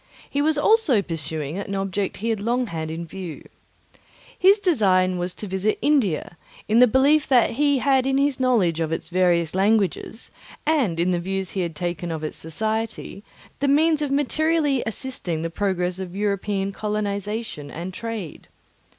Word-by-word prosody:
He 285 - -1
was 310 +1 +2
also 295 - +4
pursuing 160 -1 -4
an 200 0 -4
object 195 0 -2
he - - +1
had 220 -2 0
long 240 +4 0
had 160 -6 -5
in 165 +1 -5
view. 175 -1 -8 0.9
His 390 +3 +5
design 190 - +2
was 180 +1 -3
to - - -6
visit 190 +2 -1
India, 210 - +1 0.3
in 220 +2 +4
the 250 - +8
belief 275 +5 +3
that 250 -3 +4
he 285 +2 +2
had 265 0 +2
in 270 0 +2
his 280 -1 +1
knowledge 215 -11 +2
of 160 -1 -1
its 165 - -4
various 175 -3 +2
languages, 205 +3 0 0.3
and 265 - +1
in 175 +2 +2
the 175 - +1
views 190 +1 -3
he 190 - -2
had 170 -3 -3
taken 175 +2 -3
of 160 -1 -4
its 155 - -4
society, 220 +5 -3 0.4
the 280 - +1
means 305 +2 +3
of 295 - -1
materially 290 0 +1
assisting 205 -9 -3
the 165 - -3
progress 180 -1 -1
of 185 -1 -6
European 200 -1 -1
colonization 210 -5 -3
and 175 +5 -6
trade. 225 -6 -6
200 Hz, 170 wpm, -23 LUFS, 175-260 Hz, 0.9 s, the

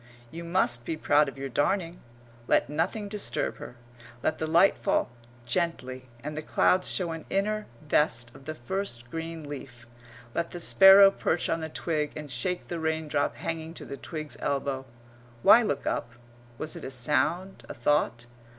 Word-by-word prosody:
You 170 +1 -7
must 170 -9 +1
be 160 +5 -3
proud 145 -1 +3
of 135 - -13
your 135 0 -4
darning. 170 +7 -1 0.5
Let - - +2
nothing 180 +7 -1
disturb 205 0 -2
her. 120 - -9 0.5
Let 155 - 0
the 160 - -1
light 170 +5 +5
fall - - 0 0.3
gently, 130 -4 -2
and 150 +1 -5
the 155 - -3
clouds 180 +4 +2
show 175 -3 -1
an 165 -1 -6
inner 215 +2 -1 0.2
vest 120 -6 +1
of 135 - -15
the 155 - -5
first 120 -4 -4
green 165 -1 -5
leaf. 130 -4 -9 0.5
Let 170 0 -1
the 175 - -7
sparrow 195 +3 +8
perch 175 -3 0
on 165 - 0
the 160 - -4
twig 155 -2 -2
and 150 -2 -6
shake 175 +9 -2
the 170 - -4
raindrop 160 -2 -1
hanging 160 0 -5
to - - -6
the - - -6
twig's 155 +1 -7
elbow.... 135 -1 -2 0.6
Why 235 - +8
look 145 - -2
up? 120 - -2 0.4
Was 155 +4 -2
it - - -8
a - - -4
sound, 160 +9 0
a - - -6
thought? 120 -2 +1
155 Hz, 170 wpm, -28 LUFS, 135-175 Hz, 0.6 s, sparrow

